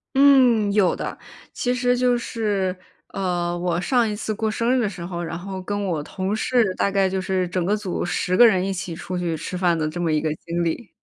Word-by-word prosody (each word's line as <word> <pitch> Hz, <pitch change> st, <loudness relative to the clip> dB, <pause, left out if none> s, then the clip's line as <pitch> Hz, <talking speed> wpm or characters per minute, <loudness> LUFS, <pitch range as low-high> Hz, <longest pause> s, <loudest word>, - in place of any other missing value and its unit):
嗯， 255 Hz, -7 st, +5 dB
有 200 Hz, -4 st, +3 dB
的， -, -, -5 dB, 0.4 s
其 245 Hz, -, -1 dB
实 250 Hz, 0 st, +2 dB
就 245 Hz, -1 st, +2 dB
是， 205 Hz, -6 st, -1 dB, 0.3 s
呃， 175 Hz, -2 st, -2 dB
我 175 Hz, -1 st, 0 dB
上 240 Hz, +2 st, +2 dB
一 210 Hz, -, -3 dB
次 215 Hz, +1 st, -3 dB
过 220 Hz, +1 st, -1 dB
生 230 Hz, +3 st, 0 dB
日 255 Hz, -, +2 dB
的 210 Hz, -, 0 dB
时 180 Hz, -3 st, -7 dB
候， 175 Hz, -1 st, -4 dB
然 165 Hz, 0 st, -4 dB
后 190 Hz, +1 st, -6 dB
跟 205 Hz, +1 st, -3 dB
我 165 Hz, -5 st, -1 dB
同 190 Hz, +6 st, -3 dB
事 225 Hz, -4 st, +1 dB
大 -, -, +1 dB
概 195 Hz, -1 st, +2 dB
就 190 Hz, 0 st, -2 dB
是 185 Hz, -1 st, -1 dB
整 180 Hz, -1 st, -1 dB
个 205 Hz, +4 st, +1 dB
组 195 Hz, -4 st, -3 dB
10 180 Hz, +1 st, -1 dB
个 240 Hz, -, +8 dB
人 190 Hz, -4 st, +2 dB
一 195 Hz, -, -1 dB
起 180 Hz, -2 st, -5 dB
出 180 Hz, +2 st, -5 dB
去 170 Hz, -2 st, -2 dB
吃 180 Hz, -, -6 dB
饭 175 Hz, -2 st, +2 dB
的 155 Hz, -1 st, -1 dB
这 175 Hz, +3 st, -4 dB
么 165 Hz, -, +1 dB
一 155 Hz, -, +2 dB
个 155 Hz, 0 st, -1 dB
经 170 Hz, 0 st, -1 dB
历。 175 Hz, +6 st, -3 dB
190 Hz, 250 characters per minute, -23 LUFS, 175-220 Hz, 0.4 s, 个